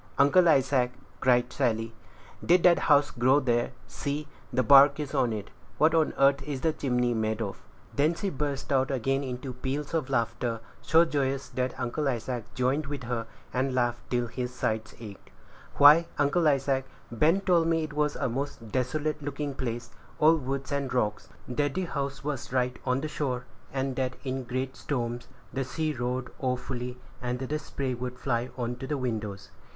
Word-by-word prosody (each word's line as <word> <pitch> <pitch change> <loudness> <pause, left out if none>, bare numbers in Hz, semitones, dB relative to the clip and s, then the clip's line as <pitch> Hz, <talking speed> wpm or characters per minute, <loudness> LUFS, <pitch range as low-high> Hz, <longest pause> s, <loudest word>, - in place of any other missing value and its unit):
"Uncle 170 +5 +6
Isaac," 130 -3 +3 0.3
cried 125 -1 +3
Sally, 115 -4 0 0.5
"did 175 +1 +4
that 175 -1 +6
house 145 -2 +4
grow 130 +4 +4
there? 120 -3 +1 0.2
See, 145 +1 -4 0.2
the 130 0 +2
bark 140 +4 +7
is 145 -3 -4
on 120 - +2
it. 105 -2 -5 0.3
What 155 +4 +4
on 160 -2 +3
earth 140 0 +4
is 140 -3 -4
the 160 -1 +2
chimney 125 -4 0
made 110 -1 -1
of?" 100 -4 -4 0.3
Then 155 +4 +3
she 195 +3 -2
burst 140 -1 -3
out 130 -1 +2
again 135 +1 0
into 125 0 -5
peals 135 +5 -4
of 160 -5 0
laughter, 115 0 -1 0.2
so 165 +2 +5
joyous 140 -3 -1
that 130 -1 -2
Uncle 135 +4 -1
Isaac 120 -2 -3
joined 135 +4 +1
with 140 -2 -5
her, 115 -1 -3 0.3
and 130 +1 0
laughed 120 -1 -1
till 120 -1 +1
his 125 +1 -4
sides 110 -3 -2
ached. 105 -4 -10 0.5
"Why, 150 +4 +8
Uncle 150 +3 +3
Isaac, 135 -2 +2 0.3
Ben 160 - +3
told 175 -4 +3
me 165 -1 +2
it 155 -1 -5
was 150 0 +1
a - - -1
most 125 -3 -4
desolate 150 +5 -1
looking 145 0 -3
place, 120 -3 -4 0.3
all 155 +2 +6
woods 135 -1 -3
and 140 -2 -1
rocks; 105 -4 -1 0.2
that 145 +3 -1
the 185 0 0
house 140 -3 -4
was 140 -2 -4
right 125 -1 0
on 130 +1 +2
the 155 - -2
shore, 130 -5 -2 0.3
and 135 -1 -2
that 130 -1 -1
in 130 -1 -3
great 130 +2 -3
storms 120 -3 -3 0.3
the 135 - -1
sea 155 +4 -2
roared 125 0 -3
awfully, 125 -1 -3 0.2
and 125 0 -2
the 135 +4 -3
spray 135 -3 -3
would 125 +1 -5
fly 125 -1 -1
on 120 0 -2
to 130 - -6
the 150 - -1
windows. 110 -6 -4
130 Hz, 180 wpm, -28 LUFS, 125-145 Hz, 0.5 s, Why